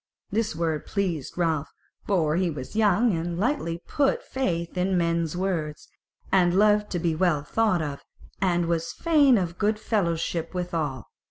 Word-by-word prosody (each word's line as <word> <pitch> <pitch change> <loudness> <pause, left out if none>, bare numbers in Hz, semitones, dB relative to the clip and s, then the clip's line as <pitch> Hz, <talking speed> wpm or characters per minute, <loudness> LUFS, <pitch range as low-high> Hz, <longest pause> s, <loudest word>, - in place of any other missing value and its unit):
This 220 -4 0
word 160 -2 -2
pleased 175 -9 -2
Ralph, 160 -4 0 0.4
for 160 -6 +2
he 180 0 +1
was 145 +2 -7
young 215 0 +3
and 170 +1 -3
lightly 185 - -1
put 280 -2 +1
faith 170 -11 -2
in 185 +1 +1
men's 170 -1 0
words, 170 -5 -3 0.4
and 180 -1 +4
loved 210 0 +4
to - - 0
be 170 -1 0
well 155 -3 +1
thought 185 0 +1
of, 140 -2 -5 0.4
and 175 -2 +2
was 165 0 -1
fain 290 -7 +4
of 175 -3 -3
good 215 +1 +2
fellowship 170 -5 -1
withal. 160 - -2
175 Hz, 155 wpm, -26 LUFS, 165-205 Hz, 0.4 s, and